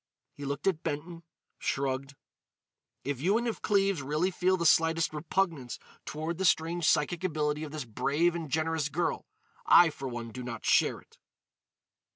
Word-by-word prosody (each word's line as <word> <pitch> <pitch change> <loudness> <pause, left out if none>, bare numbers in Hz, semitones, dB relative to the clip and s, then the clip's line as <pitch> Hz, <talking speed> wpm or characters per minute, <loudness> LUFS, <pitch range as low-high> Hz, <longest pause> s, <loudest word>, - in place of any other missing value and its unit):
He 145 - -8
looked 140 +1 -4
at 185 -5 +1
Benton, 165 +2 -4 0.4
shrugged: 135 0 -2 0.9
"If 140 -2 -3
you 195 +7 +3
and 240 +1 -1
if 230 - -3
Cleves 195 -5 +2
really 150 +7 0
feel 185 +1 +1
the 170 - -2
slightest 165 0 +3
repugnance 155 -4 -1 0.3
toward 160 +3 -4
the - - 0
strange 165 0 +2
psychic 165 +4 +2
ability 150 -3 -1
of 150 - -6
this 150 -3 -5
brave 145 +9 +1
and 165 -3 -5
generous 160 0 0
girl, - - -2 0.4
I 175 -2 +7
for 135 -2 -6
one 120 -2 -5
do 125 - -7
not 120 -2 -6
share - - +3
it." - - -23
155 Hz, 165 wpm, -29 LUFS, 140-175 Hz, 0.9 s, I